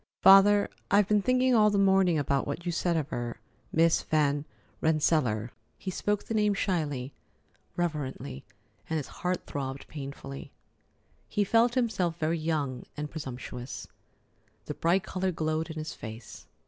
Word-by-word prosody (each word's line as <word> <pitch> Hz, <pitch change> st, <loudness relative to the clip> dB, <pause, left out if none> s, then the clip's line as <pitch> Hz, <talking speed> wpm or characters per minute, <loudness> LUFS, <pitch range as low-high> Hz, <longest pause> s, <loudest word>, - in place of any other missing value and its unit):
"Father, 200 Hz, +1 st, +8 dB, 0.2 s
I've 200 Hz, -1 st, +4 dB
been 210 Hz, -1 st, +3 dB
thinking 255 Hz, +3 st, +3 dB
all 215 Hz, -2 st, +6 dB
the 205 Hz, -, +1 dB
morning 190 Hz, -3 st, +4 dB
about 140 Hz, -2 st, 0 dB
what 150 Hz, +5 st, -4 dB
you 175 Hz, -, 0 dB
said 170 Hz, 0 st, 0 dB
of 150 Hz, -2 st, -2 dB
her—Miss 160 Hz, +6 st, -1 dB
Van 145 Hz, -1 st, +1 dB, 0.4 s
Rensselaer." 145 Hz, -8 st, +2 dB, 0.3 s
He 190 Hz, -, -5 dB
spoke 205 Hz, +2 st, -1 dB
the -, -, -5 dB
name 210 Hz, -2 st, +2 dB
shyly, 145 Hz, -9 st, -1 dB, 0.6 s
reverently, 150 Hz, -, -3 dB, 0.5 s
and 160 Hz, -, 0 dB
his 150 Hz, -, -3 dB, 0.2 s
heart 180 Hz, 0 st, -1 dB
throbbed 135 Hz, -1 st, -5 dB
painfully. 140 Hz, -1 st, -7 dB, 0.8 s
He 205 Hz, -, +1 dB
felt 230 Hz, +4 st, +3 dB
himself 200 Hz, -9 st, 0 dB
very 165 Hz, 0 st, 0 dB
young 150 Hz, -5 st, -2 dB
and 150 Hz, 0 st, -4 dB
presumptuous. 125 Hz, -4 st, -6 dB, 0.8 s
The -, -, -4 dB
bright 175 Hz, +3 st, +2 dB
color 185 Hz, 0 st, -1 dB
glowed 155 Hz, 0 st, -1 dB
in 160 Hz, -, -6 dB
his 155 Hz, 0 st, -4 dB
face. 110 Hz, 0 st, -9 dB
160 Hz, 145 wpm, -29 LUFS, 140-195 Hz, 0.8 s, Father